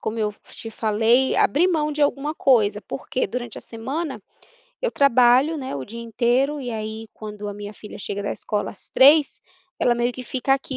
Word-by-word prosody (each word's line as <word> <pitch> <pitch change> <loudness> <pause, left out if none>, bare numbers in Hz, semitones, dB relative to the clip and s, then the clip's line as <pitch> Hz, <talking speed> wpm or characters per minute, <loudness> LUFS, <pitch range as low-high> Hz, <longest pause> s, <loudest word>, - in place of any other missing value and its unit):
como 220 +1 -3
eu 210 -1 0 0.2
te 225 - -8
falei, 225 +4 +2
abrir 315 +6 +3
mão 310 -4 +1
de 300 0 -4
alguma 290 +1 +1
coisa, 220 -9 +3
porque 140 - -3
durante 240 -1 -5
a - - -10
semana, 270 +7 -5 0.6
eu - - +1
trabalho, 260 +3 +4
né, 265 - -5
o 135 - -5
dia 230 - -9
inteiro 245 +5 0
e 250 -2 -5
aí 220 0 -5
quando 210 -1 -7
a 205 - -5
minha 205 0 -7
filha 210 0 -11
chega 200 0 -4
da 200 - -2
escola 210 -1 -3
às 195 - -6
15h, 285 +2 +5 0.4
ela 240 - +3
meio 240 +1 0
que 255 - -8
fica 265 +2 +1
aqui 270 -1 -5
240 Hz, 195 wpm, -23 LUFS, 215-275 Hz, 0.6 s, 15h